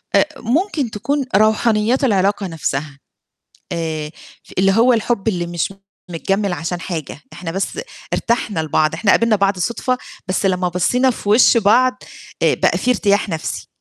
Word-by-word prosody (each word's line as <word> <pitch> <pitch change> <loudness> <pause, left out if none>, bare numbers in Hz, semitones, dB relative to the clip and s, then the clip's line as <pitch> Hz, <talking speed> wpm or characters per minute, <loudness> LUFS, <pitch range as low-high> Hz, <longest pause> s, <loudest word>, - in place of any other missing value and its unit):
أ - - +5 0.2
ممكن 280 - 0
تكون 270 +7 -1
روحانيات 220 +4 +2
العلاقة 200 -3 +1
نَفْسها، 145 -3 -4 0.7
آآ، 160 -2 -3 0.5
اللي 195 +1 +4
هو 235 +5 +4
الحُب 225 -2 0
اللي 175 -4 -1
مش 175 +2 -2 0.4
متجمل 195 +3 -1
عشان 175 +1 -3
حاجة، 160 -5 -5
إحنا 175 -3 -6
بس 195 - -3 0.3
ارتحنا 230 -7 0
لبعض، 155 0 +1
إحنا 205 - +1
قابلنا 230 -2 +4
بعض 195 -1 +1
صُدفة، 250 +6 -1 0.3
بس 190 +1 0
لمّا 180 -1 +1
بَصّينا 250 +9 +2
في 205 - -6
وش 230 +3 +6
بعض 250 +4 +3 0.4
آآ، - - +4
بقى - - +1
في 250 - 0
ارتياح 205 -3 +2
نَفْسي. 160 -4 -4
200 Hz, 150 wpm, -19 LUFS, 175-235 Hz, 0.7 s, وش